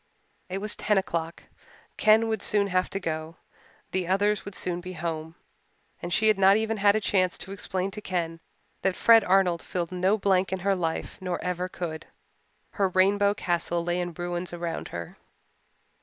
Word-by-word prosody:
It 185 Hz, -, -3 dB
was 210 Hz, +2 st, -2 dB
ten 210 Hz, -1 st, +1 dB
o'clock. 170 Hz, -3 st, -2 dB, 0.5 s
Ken 220 Hz, +1 st, +4 dB
would 220 Hz, -2 st, -1 dB
soon 200 Hz, -1 st, +1 dB
have 185 Hz, 0 st, +1 dB
to 195 Hz, -, -3 dB
go 160 Hz, -2 st, -4 dB, 0.6 s
the 185 Hz, -2 st, -1 dB
others 205 Hz, +2 st, +2 dB
would 200 Hz, -, -8 dB
soon 175 Hz, -1 st, -3 dB
be 185 Hz, +1 st, -7 dB
home 160 Hz, -1 st, -4 dB, 0.7 s
and 175 Hz, -, -5 dB
she 220 Hz, +4 st, +3 dB
had 215 Hz, -2 st, +4 dB
not 195 Hz, +1 st, +6 dB
even 220 Hz, 0 st, -1 dB
had 205 Hz, 0 st, +4 dB
a -, -, +3 dB
chance 185 Hz, -3 st, +1 dB
to 190 Hz, -, -8 dB
explain 190 Hz, -1 st, -3 dB
to 210 Hz, +2 st, -7 dB
Ken 170 Hz, -4 st, -3 dB, 0.4 s
that 190 Hz, -1 st, +1 dB
Fred 225 Hz, -2 st, +6 dB
Arnold 180 Hz, -3 st, +3 dB
filled 175 Hz, -3 st, -4 dB
no 185 Hz, +3 st, +2 dB
blank 190 Hz, -2 st, +2 dB
in 190 Hz, -, 0 dB
her 200 Hz, +1 st, +2 dB
life 165 Hz, -4 st, -3 dB
nor 180 Hz, -1 st, -2 dB
ever 180 Hz, 0 st, -2 dB
could. 165 Hz, -3 st, -6 dB, 0.6 s
Her 195 Hz, -2 st, +1 dB
rainbow 200 Hz, +2 st, +3 dB
castle 175 Hz, -2 st, -1 dB
lay 175 Hz, +1 st, -1 dB
in 175 Hz, -2 st, -5 dB
ruins 175 Hz, +1 st, -3 dB
round 170 Hz, -1 st, -4 dB
her. 85 Hz, -1 st, -7 dB
185 Hz, 180 wpm, -27 LUFS, 175-200 Hz, 0.7 s, not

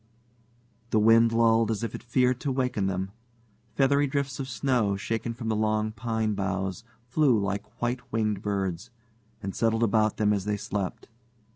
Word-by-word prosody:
The 110 Hz, -, +2 dB
wind 115 Hz, +2 st, +5 dB
lulled 115 Hz, -1 st, +3 dB
as 110 Hz, 0 st, -1 dB
if 115 Hz, -, -3 dB
it -, -, -6 dB
feared 125 Hz, +1 st, +1 dB
to 140 Hz, -, -2 dB
waken 125 Hz, -6 st, 0 dB
them. 95 Hz, 0 st, -2 dB, 0.6 s
Feathery 140 Hz, +2 st, +3 dB
drifts 140 Hz, -2 st, -2 dB
of 130 Hz, -1 st, -4 dB
snow, 115 Hz, -4 st, +1 dB
shaken 115 Hz, +3 st, -3 dB
from 115 Hz, -1 st, -6 dB
the 110 Hz, -, +1 dB
long 110 Hz, 0 st, +1 dB
pine 110 Hz, -1 st, -1 dB
boughs, 95 Hz, 0 st, -2 dB, 0.2 s
flew 130 Hz, -1 st, +3 dB
like 100 Hz, +1 st, -4 dB
white 120 Hz, +1 st, -3 dB
winged 105 Hz, -3 st, 0 dB
birds, 100 Hz, 0 st, -2 dB, 0.5 s
and 95 Hz, 0 st, -3 dB
settled 115 Hz, 0 st, +1 dB
about 110 Hz, -1 st, +2 dB
them 105 Hz, -1 st, +3 dB
as 100 Hz, -2 st, -2 dB
they 105 Hz, 0 st, 0 dB
slept. 100 Hz, -2 st, -4 dB
110 Hz, 165 wpm, -27 LUFS, 100-120 Hz, 0.6 s, wind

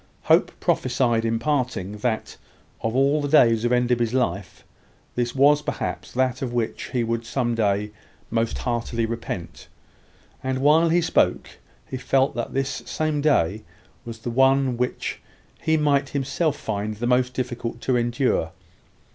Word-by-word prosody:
Hope -, -, +4 dB
prophesied, 120 Hz, -3 st, +1 dB
in 115 Hz, 0 st, +1 dB
parting, 125 Hz, -8 st, -1 dB
that, 110 Hz, -1 st, -2 dB, 0.5 s
of 115 Hz, +1 st, -2 dB
all 140 Hz, +3 st, +3 dB
the 145 Hz, -, -1 dB
days 115 Hz, -6 st, +5 dB
of 120 Hz, -, +1 dB
Enderby's 125 Hz, -1 st, +1 dB
life, 100 Hz, -7 st, -2 dB, 0.5 s
this 120 Hz, +1 st, -2 dB
was 145 Hz, +2 st, +5 dB
perhaps -, -, -4 dB
that 130 Hz, 0 st, 0 dB
of 130 Hz, -3 st, -2 dB
which 120 Hz, -2 st, -2 dB
he 125 Hz, -2 st, -1 dB
would 115 Hz, 0 st, -2 dB
one 120 Hz, -1 st, 0 dB
day 105 Hz, -2 st, 0 dB, 0.4 s
most 115 Hz, 0 st, 0 dB
heartily 115 Hz, -1 st, -1 dB
repent; 100 Hz, -7 st, -6 dB, 0.8 s
and 130 Hz, 0 st, -1 dB
while 155 Hz, +5 st, +4 dB
he 175 Hz, +2 st, +3 dB
spoke, 165 Hz, -, +1 dB, 0.4 s
he 130 Hz, -, -5 dB
felt 135 Hz, +1 st, +1 dB
that 120 Hz, 0 st, -4 dB
this 135 Hz, 0 st, -1 dB
same 155 Hz, -2 st, -1 dB
day 110 Hz, -, +2 dB, 0.4 s
was 115 Hz, -1 st, -7 dB
the 115 Hz, +2 st, -5 dB
one 135 Hz, +1 st, +3 dB
which 125 Hz, +1 st, -3 dB, 0.4 s
he 160 Hz, 0 st, +2 dB
might 140 Hz, -2 st, +2 dB
himself 145 Hz, +3 st, -1 dB
find 105 Hz, 0 st, -3 dB
the 115 Hz, +3 st, -4 dB
most 125 Hz, +1 st, +2 dB
difficult 120 Hz, -2 st, -4 dB
to 130 Hz, -, +1 dB
endure. 120 Hz, -, 0 dB
125 Hz, 150 wpm, -24 LUFS, 115-135 Hz, 0.8 s, days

